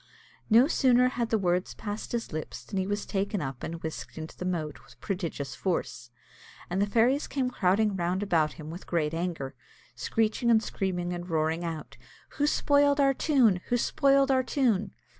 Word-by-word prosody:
No 235 +4 +6
sooner 250 -5 +4
had 240 -2 -2
the 225 - +2
words 180 -2 0
passed 210 0 -5
his 235 -7 -3
lips 155 -5 -5
than 195 - -3
he 190 - -1
was 205 0 -2
taken 200 0 -1
up 135 -5 -5
and 165 0 -6
whisked 160 0 -6
into 160 0 -7
the 180 - -6
moat 160 -5 -3
with 125 -1 -19
prodigious 165 -8 -4
force; 130 -7 -3 0.6
and 190 +2 +1
the 205 - +2
fairies 240 +7 +2
came 260 -3 -1
crowding 205 0 +2
round 180 +2 -1
about 165 -6 +2
him 155 0 -9
with 175 +3 -9
great 160 -3 0
anger, 165 -5 -3 0.4
screeching 220 - 0
and 225 -1 +5
screaming, 180 -2 -2
and 175 +1 -6
roaring 160 +1 0
out, 165 -3 -6 0.3
"Who 290 0 0
spoiled 285 -1 +3
our 275 -1 +4
tune? 250 - +3
who 245 - +2
spoiled 275 +2 +3
our 260 -1 +4
tune?" 230 -7 +1
190 Hz, 180 wpm, -28 LUFS, 165-240 Hz, 0.6 s, No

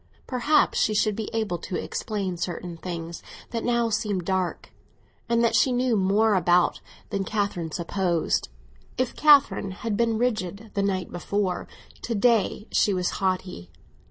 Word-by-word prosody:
Perhaps 270 +4 +2
she 215 - +2
should 210 0 +2
be 220 0 -4
able 215 -6 -1
to 180 - -5
explain 195 -1 -3
certain 175 0 -4
things 170 -1 -6 0.3
that 230 -1 -3
now 235 -1 +1
seemed 210 -5 -1
dark, 185 -1 -2 0.6
and 235 0 +3
that 230 -1 +3
she 240 +4 +4
knew 250 -1 +1
more 205 +3 +3
about 180 -2 +3 0.3
than 200 -2 -1
Catherine 195 -6 -2
supposed. 170 - -1 0.5
If 255 -1 -1
Catherine 285 -9 +5
had 205 +3 -3
been 230 0 +1
frigid 215 -3 -2
the 200 - 0
night 190 -2 -1
before, 185 +1 -2 0.3
to 230 - -3
day 220 -1 +2
she 200 - +3
was 180 -1 0
haughty. 185 - -2
200 Hz, 150 wpm, -25 LUFS, 180-225 Hz, 0.6 s, Catherine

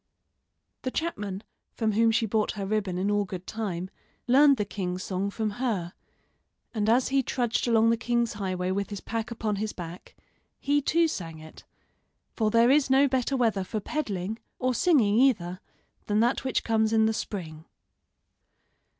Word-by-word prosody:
The 255 - -2
chapman, 210 - -3 0.3
from 220 -2 0
whom 225 +2 +3
she 225 0 +2
bought 215 0 0
her 200 -2 -4
ribbon 200 -3 -1
in 195 +3 0
all 205 0 +2
good 185 -2 -7
time, 190 -4 -4 0.3
learned 275 +2 +6
the 210 - -1
king's 185 -2 -4
song 190 +1 -2
from 215 +1 -2
her; 195 -9 -1 0.8
and 215 -2 0
as 245 +3 +3
he 275 0 +3
trudged 245 -2 -1
along 230 -1 +4
the 230 - +2
king's 235 0 0
highway 185 -3 -2
with 200 +1 -2
his 205 -2 -5
pack 225 +1 -4
upon 220 -3 -2
his 215 +1 -3
back 175 0 -9 0.4
he, 290 +1 +1
too, 330 +4 +3
sang 165 - -5
it; 155 0 -13 0.7
for 220 -2 +1
there 230 +3 +5
is 285 -1 +3
no 270 +2 +5
better 260 +1 0
weather 220 -6 +1
for 215 +3 -3
peddling 210 -5 -3 0.2
or 255 0 0
singing, 240 - +3
either, 185 -9 +2 0.5
than 210 0 +2
that 240 +3 +2
which 260 -2 0
comes 220 -1 +1
in 220 0 +4
the 220 - +2
spring. 160 -8 -5
220 Hz, 170 wpm, -27 LUFS, 195-240 Hz, 0.8 s, learned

